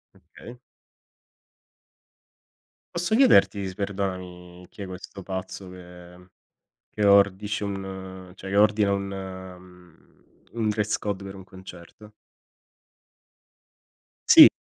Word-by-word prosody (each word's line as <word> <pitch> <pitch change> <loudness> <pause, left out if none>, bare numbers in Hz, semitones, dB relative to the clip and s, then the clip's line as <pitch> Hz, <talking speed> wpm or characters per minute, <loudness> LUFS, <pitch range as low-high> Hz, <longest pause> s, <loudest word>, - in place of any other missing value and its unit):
Okay. 120 +1 -14 2.4
Posso 175 +5 0
chiederti, 220 - +4
s 95 - -7
perdonami 90 -3 -5
chi - - -12
è - - -5
questo 95 +1 -9
pazzo 95 0 -6
che 90 0 -14 0.7
che 105 - +2
ordisce 100 +1 +3
un 95 -2 -6
cioè, 95 0 -9
che 100 - -2
ordina 105 -1 +4
un 100 0 0
mhmm, 95 -3 -11 0.4
un 115 -2 -1
dress 105 0 0
code 100 -2 -4
per 95 0 -8
un 95 - -10
concerto? 95 +2 -13 2.2
Sì. - - +11
95 Hz, 105 wpm, -25 LUFS, 90-100 Hz, 2.4 s, Sì